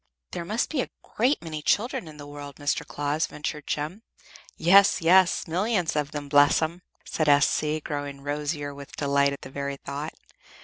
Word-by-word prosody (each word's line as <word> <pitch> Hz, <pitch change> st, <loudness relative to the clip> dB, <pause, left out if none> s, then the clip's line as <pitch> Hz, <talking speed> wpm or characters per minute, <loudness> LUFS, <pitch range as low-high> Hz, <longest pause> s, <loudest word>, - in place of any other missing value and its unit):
"There 170 Hz, -, -4 dB
must 215 Hz, +6 st, -1 dB
be 295 Hz, -5 st, +1 dB
a -, -, -5 dB
great 250 Hz, +2 st, 0 dB
many 155 Hz, -2 st, -5 dB
children 205 Hz, +1 st, 0 dB
in 155 Hz, -1 st, -11 dB
the 145 Hz, -, -9 dB
world, 145 Hz, -1 st, -9 dB
Mr. 145 Hz, 0 st, -1 dB
Claus," 145 Hz, +2 st, -1 dB
ventured 150 Hz, 0 st, -5 dB
Jem. 155 Hz, +8 st, -3 dB, 0.6 s
"Yes, 195 Hz, +4 st, +6 dB
yes, 180 Hz, +2 st, +4 dB
millions 180 Hz, +1 st, 0 dB
of 150 Hz, 0 st, -2 dB
'em; 145 Hz, -1 st, -4 dB
bless 145 Hz, 0 st, +5 dB
'em," 165 Hz, +3 st, -2 dB, 0.2 s
said 155 Hz, -2 st, 0 dB
S.C., 150 Hz, +2 st, +3 dB
growing 145 Hz, -2 st, -5 dB
rosier 145 Hz, 0 st, -3 dB
with 140 Hz, 0 st, -11 dB
delight 140 Hz, -1 st, +2 dB
at 140 Hz, -, -8 dB
the 130 Hz, -, -10 dB
very 140 Hz, 0 st, -4 dB
thought. 145 Hz, +3 st, -6 dB
150 Hz, 175 wpm, -26 LUFS, 145-170 Hz, 0.6 s, Yes